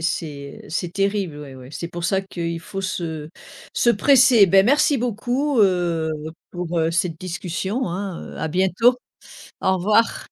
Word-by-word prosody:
c'est, 145 -4 -4
heu, - - -13
c'est 170 +2 -3
terrible 195 -5 -1
ouais, 140 -3 -9
ouais. 130 +1 -12
C'est 170 - -5
pour 175 0 -6
ça 190 +3 +2
qu'il 170 -3 -5
faut 195 +2 -6
se 160 -5 -4 0.4
se 240 - +3
presser. 245 -2 +6
Ben, 195 +2 +5
merci 290 +2 +3
beaucoup, 245 +4 -1
heu, 175 -5 +2 0.4
pour, 175 -1 -3
heu, 160 0 +1
cette 165 -1 -1
discussion, 185 +6 -3
hein, 185 0 -5
heu, - - -10
à - - -2
bientôt, 190 +8 +3 0.7
au 190 - +3
revoir. 215 +5 +2
185 Hz, 165 wpm, -22 LUFS, 165-210 Hz, 0.7 s, presser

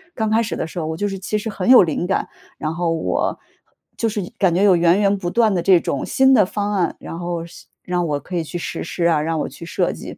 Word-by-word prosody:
刚 220 -2 -1
开 220 +1 +3
始 225 - -3
的 - - -3
时 165 - -11
候 160 - -3
我 160 - -3
就 205 +5 -1
是 195 - -5
其 195 +3 -2
实 215 +2 -4
很 200 0 -3
有 255 -4 +9
灵 165 0 -2
感， 190 - 0 0.3
然 155 +1 -3
后 170 0 -1
我， 160 - -1 0.6
就 230 - 0
是 210 -1 -2 0.2
感 185 -5 +2
觉 185 - +2
有 195 -3 +6
源 170 +3 +4
源 200 0 +2
不 175 -2 -3
断 225 -3 +3
的 175 - 0
这 180 -1 +5
种 140 - -2
新 265 0 +3
的 210 -7 +5
方 205 +2 -3
案， 180 -4 0
然 165 - -7
后 175 -1 -3
实 170 - -14 0.2
让 180 -1 -1
我 145 -2 -1
可 180 +7 -7
以 165 - -1
去 165 - -6
实 165 - -5
施 170 - -2
啊， 165 -3 +3
让 160 +1 -1
我 - - -3
去 170 - -11
设 - - 0
计。 - - -9
180 Hz, 295 characters per minute, -20 LUFS, 165-205 Hz, 0.6 s, 有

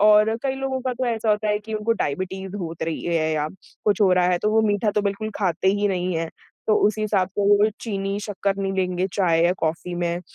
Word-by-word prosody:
और 215 +1 +5
कई 270 -1 0
लोगों 265 -1 -2
का 255 0 -2
तो 255 +1 -2
ऐसा 225 -2 0
होता 210 0 +1
है 210 0 +2
कि 215 +1 -7
उनको 215 +2 +1
डायबिटीज़ 190 +1 -3
होत 165 -4 -5
रही 160 -1 -2
है 165 -2 +1
या 150 -1 0 0.4
कुछ 210 -2 +2
हो 195 -3 +5
रहा 180 -1 +4
है, 180 -1 +2
तो 210 +4 0
वो 220 +1 +4
मीठा 205 +1 +1
तो 210 0 0
बिल्कुल 200 +2 -2
खाते 190 -2 +1
ही 205 0 +1
नहीं 180 -1 -1
हैं। 165 0 -2 0.4
तो 215 - +4
उसी 215 +1 0
हिसाब 200 -4 +1
से - - -1
वो 205 +1 +5
चीनी, 195 -2 -2
शक्कर 200 -1 -2
नहीं 195 -1 -2
लेंगे 185 -1 0
चाय 170 -4 +2
या 175 - +4
कॉफ़ी 165 +2 -2
में, 175 0 -1
200 Hz, 240 wpm, -23 LUFS, 180-215 Hz, 0.4 s, और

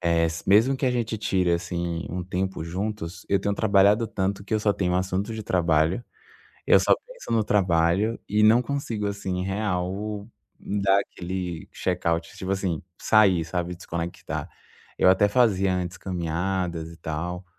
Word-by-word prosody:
Eh, 85 -1 +2
s 85 +2 -3
mesmo 115 +7 +5
que 130 0 -1
a - - +3
gente 115 -3 -1
tire, 95 -4 +1
assim, 85 -1 -2
um 90 +1 -3
tempo 95 0 -3
juntos, 90 0 -4
eu 100 - +3
tenho 100 0 0
trabalhado 105 +2 +4
tanto 100 0 -2
que 110 - -2
eu 105 - +1
só 105 -1 +2
tenho 90 -3 -1
assunto 95 +4 -1
de 110 - -5
trabalho, 85 +3 +1 0.6
eu - - +6
só - - +4
penso - - -10
no 110 -2 +3
trabalho 95 +2 +2
e 105 +1 +3
não 115 +3 +6
consigo, 120 -6 -3
assim, 95 -2 -3
real 100 +1 -2 0.3
dar 100 -1 +2
aquele 90 -3 -5
check 90 -1 -3
out, 85 0 +1
tipo 95 0 -3
assim, 95 -5 -1 0.2
sair, 95 -6 +4
sabe, 90 +1 -3
desconectar. 85 -1 -5 0.5
Eu 95 - +4
até 95 +2 +5
fazia 100 -4 +3
antes, 90 -1 -3
caminhadas 85 -1 -2
e 85 - -13
tal 85 +4 -4
95 Hz, 165 wpm, -25 LUFS, 85-105 Hz, 0.6 s, eu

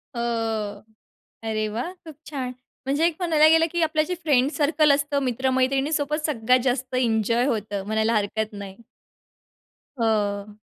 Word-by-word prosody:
हो, 235 - -2 1.3
अरे 215 -1 -1
वाह! 240 +12 -4
खूप 315 - -9 0.2
छान! 260 -4 -4 0.3
म्हणजे 285 +5 +2
एक 340 - 0
म्हणायला 315 -3 +4
गेलं, 325 +1 +5
की 345 -1 0
आपलं 315 -1 +2
जे 360 - -1
फ्रेंड्स 280 -2 +2
सर्कल 300 0 +3
असतं, 285 0 0
मित्र-मैत्रिणीसोबत 270 +4 0
सगळ्यात 250 -3 +2
जास्त 255 0 -1
एन्जॉय 230 -1 +1
होतं, 210 -5 -2
म्हणायला 220 +2 +1
हरकत 215 +1 -1
नाही? 200 -2 -8 1.2
हो. 210 -2 0
255 Hz, 135 wpm, -24 LUFS, 220-300 Hz, 1.3 s, गेलं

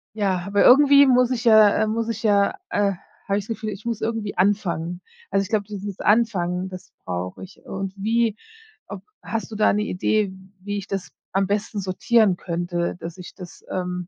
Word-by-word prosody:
Ja, 190 -4 0
aber 200 0 +2
irgendwie 280 +1 +7
muss 250 -1 +4
ich 235 -3 -2
ja, 220 -2 +7
äh 215 +1 +1
muss 225 +1 -1
ich 225 -2 -4
ja, 200 -2 +3
äh 200 -1 +1 0.3
habe 200 0 +1
ich 200 - -7
das 225 - -3
Gefühl, 215 - -5
ich 205 +1 -8
muss 230 -2 -3
irgendwie 220 -4 -3
anfangen. 180 -3 0 0.3
Also, 195 0 +2
ich 195 - -8
glaube, 205 -2 0
dieses 200 -1 -7
Anfangen, 190 -5 +1
das 185 0 -11
brauche 90 0 -5
ich. 190 - -14
Und 195 0 -5
wie 225 +2 +1 0.5
ob - - -8 0.2
hast 225 -1 -4
du - - -6
da 215 - +3
'ne 210 - 0
Idee, 205 +1 0 0.3
wie 205 +2 -4
ich 200 -1 -6
das 195 -2 -4 0.2
am 195 0 +1
besten 205 +1 -2
sortieren 195 +2 +2
könnte, 175 0 -3
dass 170 +1 -8
ich 180 - -10
das, 180 -1 -12
ähm 180 -1 -3
200 Hz, 195 wpm, -23 LUFS, 185-220 Hz, 0.5 s, irgendwie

